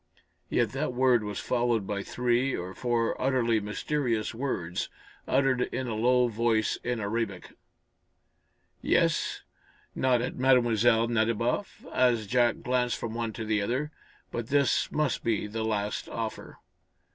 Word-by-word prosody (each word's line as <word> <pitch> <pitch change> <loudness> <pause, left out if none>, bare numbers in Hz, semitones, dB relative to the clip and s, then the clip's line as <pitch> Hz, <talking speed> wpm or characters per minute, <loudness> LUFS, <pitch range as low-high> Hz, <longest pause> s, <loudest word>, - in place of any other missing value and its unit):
Yet 120 -3 +1
that 135 +1 -2
word 125 -2 +3
was 105 -1 -4
followed 120 0 0
by 100 0 -2
three 125 +4 0
or 90 +2 -5
four 120 -1 0
utterly 125 -4 +2
mysterious 115 +2 -1
words, 110 -9 -3 0.4
uttered 135 -2 +2
in 130 +1 -2
a 120 - -3
low 125 +3 +3
voice 115 -1 +1
in 120 -1 -1
Arabic. 100 -2 -3 1.3
"Yes," - - +1 0.5
nodded 125 -1 0
Mlle. 120 -3 +4
Nadiboff, 115 - -1
as 120 -4 +3
Jack 120 +2 +2
glanced 125 -1 +1
from 115 -1 -5
one 115 -1 -2
to 110 - -5
the 105 -1 +1
other, 130 +9 -1 0.4
"but 115 -1 -4
this 140 -1 +2
must 150 -3 0
be 110 -3 0
the 110 +2 -4
last 105 -2 -2
offer." 115 -1 -5
120 Hz, 135 wpm, -28 LUFS, 110-125 Hz, 1.3 s, Mlle